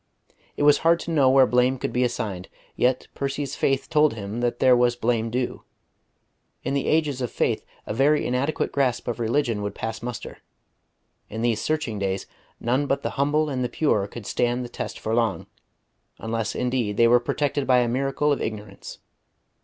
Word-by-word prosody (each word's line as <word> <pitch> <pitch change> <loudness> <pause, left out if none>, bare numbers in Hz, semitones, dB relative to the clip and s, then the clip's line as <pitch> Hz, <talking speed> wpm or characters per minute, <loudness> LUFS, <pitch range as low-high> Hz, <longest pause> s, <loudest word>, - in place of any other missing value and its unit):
It - - 0
was 145 0 +6
hard 165 +1 +3
to 170 - -5
know 140 -5 +4
where 135 0 +6
blame 125 +1 +2
could - - -4
be 125 - +2
assigned; 110 -7 -3 0.3
yet 125 +1 +1
Percy's 140 0 -3
faith 135 -1 0
told 150 -5 +3
him 105 +1 -5
that 120 0 0
there 130 0 +5
was 120 0 +3
blame 115 -1 0
due. 125 +2 -3 1.0
In - - -2
the 140 - -1
ages 150 -4 +1
of 125 - -2
faith - - 0 0.2
a - - -3
very 140 +6 +3
inadequate 130 +5 -1
grasp 130 -4 0
of 120 0 -3
religion 115 -2 0
would 100 0 -4
pass 110 0 -4
muster; 120 -1 -6 0.9
in 110 +2 -4
these 115 -2 +1
searching 150 -9 -1
days 95 0 -2 0.3
none 130 +5 0
but 140 0 0
the - - -2
humble 150 +3 +1
and 130 -3 -2
the 125 - -1
pure 105 -10 +1
could 110 +1 -9
stand 125 +3 0
the - - -8
test - - -5
for 110 - -3
long, 115 -1 0 0.7
unless 110 -1 -3
indeed 125 -5 -1
they 115 - +6
were 120 +1 +6
protected 140 +2 -1
by 130 -1 +5
a 125 -1 +3
miracle 135 +4 0
of 140 - 0
ignorance. 105 -2 -6
125 Hz, 185 wpm, -24 LUFS, 115-140 Hz, 1.0 s, was